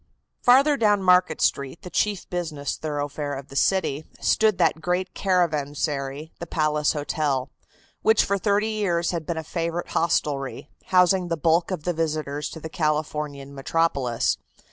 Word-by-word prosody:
Farther 275 +4 +5
down 210 -4 +3
Market 180 -3 +4
Street, 140 +3 0
the 180 - -8
chief 205 +2 0
business 155 -6 -3
thoroughfare 145 -1 -3
of 135 +1 -8
the 135 - -11
city, 155 -3 +1 0.2
stood 215 -3 +3
that 165 -2 +2
great 180 +3 -1
caravansary, 150 -4 -1
the 170 - -6
Palace 150 -2 +1
Hotel, 145 -3 -1 0.5
which 220 - +4
for 200 0 0
thirty 205 +2 +1
years 175 -6 0
had 165 -3 -4
been 170 - -2
a 160 - -3
favorite 170 +1 -3
hostelry, 145 -4 -1
housing 180 0 +3
the 165 -1 -1
bulk 165 +3 +2
of 180 -6 -4
the 175 - 0
visitors 155 -3 -2
to 160 - -8
the 160 - -6
Californian 150 -3 -2
metropolis. 135 -4 0
160 Hz, 150 wpm, -24 LUFS, 145-180 Hz, 0.5 s, Farther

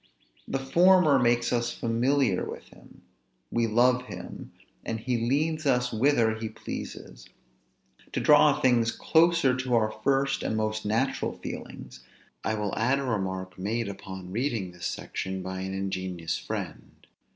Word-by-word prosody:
The - - -1
former 165 +2 +5
makes 120 0 +2
us 120 0 0
familiar 125 +3 +1
with - - -8
him; - - -18 0.5
we 115 -1 +1
love 125 +3 +3
him, - - -9 0.3
and 115 0 -3
he 125 +3 -1
leads 155 +2 0
us 125 -2 +2
whither 115 -1 +3
he 110 0 -5
pleases. - - -8 0.8
To - - 0
draw - - +5
things 120 -3 +3
closer 165 -5 +3
to 130 -1 0
our 110 -2 +2
first 135 0 +1
and 110 - -1
most 110 -1 -2
natural 110 +2 0
feelings, - - -8 0.4
I 110 - 0
will 105 -2 -2
add 125 +5 +2
a 140 - -2
remark 95 -6 -3
made 110 +4 -1
upon 95 -2 -8
reading 115 -4 -2
this 90 -1 -5
section 95 0 -4
by 95 0 -5
an 95 +1 -4
ingenious 95 -4 -3
friend. - - -7
115 Hz, 145 wpm, -27 LUFS, 100-130 Hz, 0.8 s, former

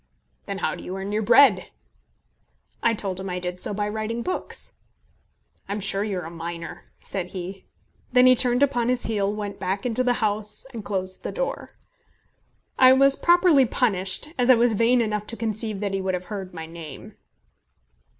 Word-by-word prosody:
"Then 200 -1 -3
how - - -1
do - - -8
you 185 - -5
earn 195 +1 -5
your 215 +1 0
bread?" 220 -3 +5 1.1
I 230 -1 +2
told 195 -3 -2
him 190 - -5
that 180 - -3
I - - -2
did 180 0 -5
so - - +1
by 205 0 -1
writing 220 +2 -3
books. 370 - -4 1.0
"I'm 205 +1 -2
sure 195 0 0
you're 195 -4 -3
a 165 - -7
miner," 170 0 -7
said 185 -3 -4
he. 190 +1 -7 0.5
Then 250 0 +6
he 255 0 +7
turned 245 +1 +3
upon 245 -4 +1
his 250 -1 0
heel, 205 -3 0
went 205 -1 -5
back 195 +3 -2
into 245 +1 +1
the 250 -1 +2
house, 210 -1 -2
and 225 -3 -6
closed 185 -2 -4
the - - -4
door. - - -3 1.1
I 255 0 +8
was 275 +1 +5
properly 345 -6 +5
punished, 200 +2 0
as 245 +1 +2
I 255 - +9
was 235 0 +3
vain 235 +3 +3
enough 210 -2 -2
to 230 - -4
conceive 215 -2 -3
that 200 -1 -2
he 195 - -1
would 190 -1 -1
have 180 0 -6
heard 190 -2 -5
my 160 -2 -7
name. 160 -4 -10
210 Hz, 190 wpm, -24 LUFS, 190-240 Hz, 1.1 s, I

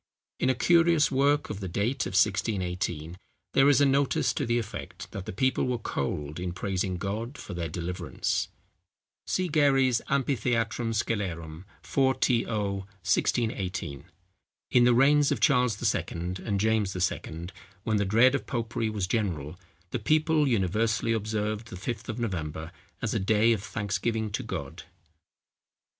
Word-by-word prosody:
In 130 - +2
a 130 - +2
curious 165 +1 +4
work 140 +2 +2
of 105 - -5
the 95 - -4
date 110 +9 -1
of - - -7
1618, 90 -4 0 0.4
there 135 +1 +6
is 145 0 +5
a - - +6
notice 140 0 +2
to 140 - -2
the 120 0 +2
effect 100 -4 -6
that 100 -3 -7
the - - -3
people 130 +7 +1
were 125 -1 0
cold 75 -6 -3
in 90 -1 -3
praising 95 -1 -2
God 110 +8 -4
for - - -8
their 85 -2 -3
deliverance. 90 +1 -2 0.8
See 185 -1 0
GAREY'S 135 -6 +3
Amphitheatrum 120 -4 0
Scelerum. 90 -7 -3 0.2
4to. 130 -3 +2 0.3
1618. 95 - -2 0.7
In 120 -1 +5
the 120 -1 +5
reigns 145 +3 +5
of 140 - 0
Charles 125 -1 +3 0.2
II. - - -1 0.4
and 100 -3 -1
James 105 -2 +1
II., 85 -2 -2 0.3
when 110 -1 +1
the 100 - +2
dread 115 +7 +5
of 140 - -2
popery 115 -2 -2
was 105 -3 -1
general, 90 -8 -2 0.4
the 125 - -1
people 155 +4 +2
universally 110 +1 +1
observed 110 0 -2
the 95 - -8
Fifth 115 +4 -5
of 110 - -3
November 80 -8 -3 0.3
as - - 0
a - - +1
day 110 +4 +3
of 105 - -2
thanksgiving 110 +2 -2
to - - -2
God. - - -6
110 Hz, 150 wpm, -28 LUFS, 95-125 Hz, 0.8 s, there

